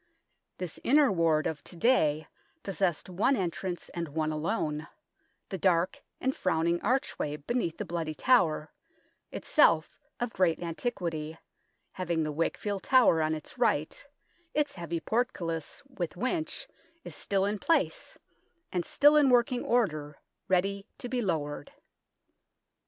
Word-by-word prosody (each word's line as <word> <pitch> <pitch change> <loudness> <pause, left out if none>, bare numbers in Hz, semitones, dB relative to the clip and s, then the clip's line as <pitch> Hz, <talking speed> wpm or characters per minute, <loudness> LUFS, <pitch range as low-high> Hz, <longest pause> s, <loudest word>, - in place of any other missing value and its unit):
This 180 -3 -5
Inner 285 -1 +5
Ward 165 -4 +2
of 155 -2 -3
to - - -9
day 160 - +3 0.4
possessed 190 -4 -1
one 195 +9 +2
entrance, 180 -2 -3
and 170 -1 -4
one 155 +1 -1
alone 155 -1 -2 0.6
the 190 - -4
dark 180 -1 +2 0.2
and 265 +1 0
frowning 170 +2 +1
archway 210 - 0
beneath 170 - -2
the - - -4
Bloody 165 -2 -3
Tower, 160 - +3 0.6
itself - - +3 0.2
of 240 -1 -2
great 180 -3 +2
antiquity, 165 -3 -3 0.5
having 170 -3 -1
the 155 - -2
Wakefield 190 +6 -2
Tower 250 -11 +5
on 155 0 +1
its 155 +9 -10
right; 160 -11 +1 0.5
its 295 -1 +1
heavy 170 -2 -4
portcullis, 175 - -2
with 180 - -5
winch, 310 - -2 0.4
is - - -8
still 195 -1 0
in 205 +1 -1
place, 335 - 0 0.5
and 180 -1 0
still 290 - +5
in 295 -3 +6
working 245 0 +3
order, 155 - 0 0.3
ready 195 +2 +1
to 245 - -6
be 250 -1 0
lowered. 160 - -3
180 Hz, 130 wpm, -29 LUFS, 160-240 Hz, 0.6 s, in